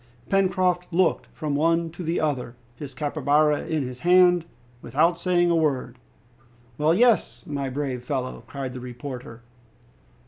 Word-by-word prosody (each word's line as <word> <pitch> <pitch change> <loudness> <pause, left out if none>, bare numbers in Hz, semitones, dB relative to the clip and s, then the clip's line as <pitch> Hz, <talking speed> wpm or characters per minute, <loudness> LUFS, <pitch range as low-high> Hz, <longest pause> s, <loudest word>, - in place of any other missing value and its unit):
Pencroft 185 -2 +1
looked 175 0 +1
from 155 -3 -4
one 165 +3 +1
to 175 - -9
the 165 0 -1
other, 130 -6 -2 0.2
his 135 0 -9
capybara 150 +1 +1
in 155 -3 -1
his 125 -1 -7
hand, 180 -1 +5 0.4
without 160 +8 +1
saying 175 -1 +2
a - - +3
word. 135 -6 -1 0.8
"Well, 155 +2 +3
yes, 210 - +2
my 140 -2 -3
brave 130 -2 -3
fellow," 130 0 -4
cried 135 -2 -5
the 130 - -6
reporter. 125 -1 -8
150 Hz, 140 wpm, -24 LUFS, 130-175 Hz, 0.8 s, hand